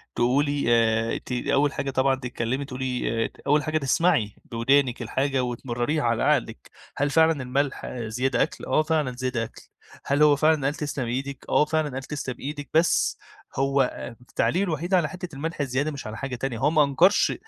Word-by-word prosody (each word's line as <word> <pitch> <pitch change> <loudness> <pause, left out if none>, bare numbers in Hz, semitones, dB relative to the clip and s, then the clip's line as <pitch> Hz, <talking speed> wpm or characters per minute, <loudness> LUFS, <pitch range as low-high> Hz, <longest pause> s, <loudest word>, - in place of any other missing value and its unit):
تقولي 140 +4 +1
آآ، 115 -1 +2
ت - - -9
أول 140 +3 +1
حاجة 140 - -3
طبعًا 130 +1 +2
تتكلّمي 125 +1 -3
تقولي 130 -3 -2
آآ، - - -4 0.2
أول 150 +1 +3
حاجة 155 0 0
تسمعي 140 - +1 0.2
بودانِك 125 +2 +2
الحاجة، 135 +3 0
وتمرّريها 120 +4 -2
على 115 -1 +1
عقلِك - - 0 0.3
هل 145 +1 +1
فعلًا 160 -2 +3
الملح 135 +2 -1
زيادة 120 +2 -1
أكل، - - -6
آه 145 +4 +2
فعلًا 155 -4 0
زيادة 130 -2 -2
أكل، 115 - -9 0.4
هل 145 +2 +3
هو 150 -1 +6
فعلًا 155 0 +2
قال 145 +2 0
تسلم 145 -4 -3
إيدِك، 135 +3 -4
آه 150 - +4
فعلًا 155 0 0
قال 135 0 -5
تسلم 135 -3 -5
إيدِك، 145 0 -6
بس 165 +2 +3 0.4
هو 135 +1 +2
آآ، 125 -2 -3
التعليق 170 +8 0
الوحيد 175 0 -2
على 170 -5 +3
حتة 180 -4 -8
الملح 155 +2 -4
الزيادة 135 +3 -1
مش 140 -6 -7
على 110 +1 -6
حاجة 135 0 -4
تانية، 125 -1 -3
هو 135 - +3
ما 155 -2 +5
أنكرش 165 +8 +3
135 Hz, 180 wpm, -25 LUFS, 125-150 Hz, 0.4 s, هو